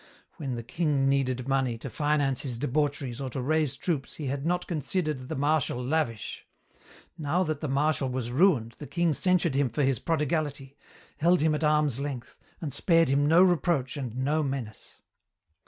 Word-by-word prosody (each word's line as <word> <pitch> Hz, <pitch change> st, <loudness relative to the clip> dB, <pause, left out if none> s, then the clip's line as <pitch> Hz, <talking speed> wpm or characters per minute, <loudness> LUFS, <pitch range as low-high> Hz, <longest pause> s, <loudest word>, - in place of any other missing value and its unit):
When 135 Hz, -7 st, -3 dB
the 115 Hz, -, -5 dB
king 145 Hz, 0 st, 0 dB
needed 130 Hz, -2 st, 0 dB
money 135 Hz, -3 st, +1 dB
to 120 Hz, -, -7 dB
finance 145 Hz, +1 st, 0 dB
his 125 Hz, -4 st, -3 dB
debaucheries 140 Hz, -1 st, -1 dB
or 135 Hz, -, -3 dB
to 130 Hz, -, -5 dB
raise 150 Hz, +1 st, +1 dB
troops 150 Hz, -5 st, -2 dB
he 150 Hz, -, -6 dB
had 140 Hz, +3 st, -2 dB
not 180 Hz, +1 st, 0 dB
considered 155 Hz, -4 st, -2 dB
the -, -, -3 dB
Marshal 145 Hz, -2 st, +1 dB
lavish. 135 Hz, -7 st, -2 dB, 0.7 s
Now 160 Hz, +5 st, +1 dB
that 155 Hz, -4 st, -3 dB
the 155 Hz, -, -2 dB
Marshal 140 Hz, 0 st, +1 dB
was 125 Hz, -2 st, -3 dB
ruined 130 Hz, -, +3 dB
the 145 Hz, -, -7 dB
king 170 Hz, -2 st, +1 dB
censured 180 Hz, -1 st, +2 dB
him 135 Hz, -1 st, +2 dB
for 130 Hz, +6 st, -1 dB
his 135 Hz, -4 st, +1 dB
prodigality, 150 Hz, -3 st, -2 dB, 0.4 s
held 175 Hz, +3 st, +3 dB
him 155 Hz, 0 st, +2 dB
at 150 Hz, -, -2 dB
arm's 150 Hz, -4 st, +2 dB
length, 140 Hz, -3 st, -6 dB, 0.2 s
and 150 Hz, -6 st, -5 dB
spared 165 Hz, +1 st, +3 dB
him 140 Hz, +2 st, +3 dB
no 165 Hz, +4 st, +6 dB
reproach 170 Hz, -7 st, +1 dB
and 125 Hz, -5 st, -5 dB
no 145 Hz, +4 st, +1 dB
menace. 135 Hz, -6 st, -5 dB
145 Hz, 175 wpm, -28 LUFS, 130-155 Hz, 0.7 s, no